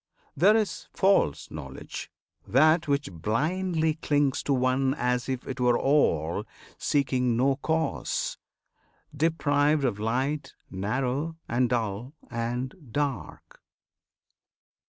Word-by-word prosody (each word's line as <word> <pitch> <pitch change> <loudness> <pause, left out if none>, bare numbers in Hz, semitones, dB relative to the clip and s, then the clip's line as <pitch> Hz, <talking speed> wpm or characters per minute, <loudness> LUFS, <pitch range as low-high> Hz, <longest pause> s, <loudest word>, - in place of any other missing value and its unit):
There 200 +8 +5
is 205 -6 -2
false 190 - +2
Knowledge: 70 -4 -7 0.4
that 155 +6 +4
which 140 -6 0
blindly 160 - 0
clings 145 -2 +1
To - - -2
one 130 +1 +2
as 125 -1 -1
if 130 -2 -1
'twere 125 -2 +1
all, 85 - +2 0.3
seeking 125 -4 +1
no 135 +2 +2
Cause, 160 +2 -1 0.8
Deprived 150 -1 +2
of 110 -5 -1
light, 130 +5 -1 0.2
narrow, 130 - -2
and 120 +1 +1
dull, 115 +2 -2 0.2
and 120 +2 -2 0.2
"dark." 140 -5 -4
135 Hz, 100 wpm, -27 LUFS, 120-150 Hz, 0.8 s, There